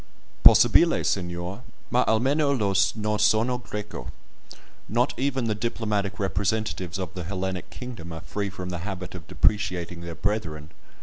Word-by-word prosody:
"Possibile, - - +7
signor, 90 +2 -2 0.3
ma 125 - +4
almeno 140 +6 +3
Io 100 -4 +1 0.2
no 105 -1 -1
sono 120 +3 +3
Greco." 105 - -6 0.8
Not 120 +6 +2
even 130 -1 0
the 110 - +1
diplomatic 105 -2 -2
representatives 100 -2 -1
of 95 -4 -4
the 90 - -5
Hellenic 95 0 -3
kingdom 115 -10 -8
are 80 0 -6
free 100 +2 -3
from 90 -1 -6
the 90 - -3
habit 90 -1 -5
of 90 -4 -9
depreciating 90 -5 0
their 85 -1 -6
brethren. 80 -8 -2
100 Hz, 140 wpm, -26 LUFS, 90-110 Hz, 0.8 s, Possibile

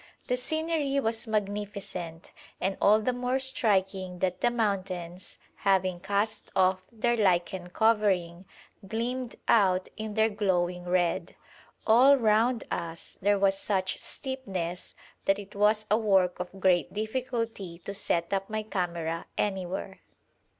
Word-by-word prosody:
The 250 - +1
scenery 310 +1 0
was 225 -2 0
magnificent, 200 -5 -4 0.3
and 195 +1 0
all 210 +2 +6
the 250 +4 0
more 250 +1 0
striking 195 -8 0
that 180 0 -1
the 240 - +4
mountains, 185 -6 -3 0.2
having 185 -2 +1
cast 205 +3 -1
off 185 0 +3
their 235 +1 +1
lichen 185 -3 +1
covering, 190 -5 +1 0.4
gleamed 240 +4 -3
out 190 -4 +3
in 215 -1 -5
their 220 0 +4
glowing 180 -4 0
red. 180 0 0 0.5
All 255 +5 +7
round 230 +1 +2
us 165 -1 -5
there 205 +1 +3
was 195 0 +3
such 190 -3 -1
steepness 190 -10 -4 0.3
that 195 - +3
it 205 -1 -10
was 210 +1 +2
a 215 - +5
work 190 -5 +2
of 180 +2 -6
great 185 -2 +3
difficulty 220 -4 -3
to 200 - -4
set 170 -3 0
up 195 0 -1
my 215 0 -2
camera 170 -5 -3
anywhere. 190 -1 -2
200 Hz, 130 wpm, -28 LUFS, 185-220 Hz, 0.5 s, All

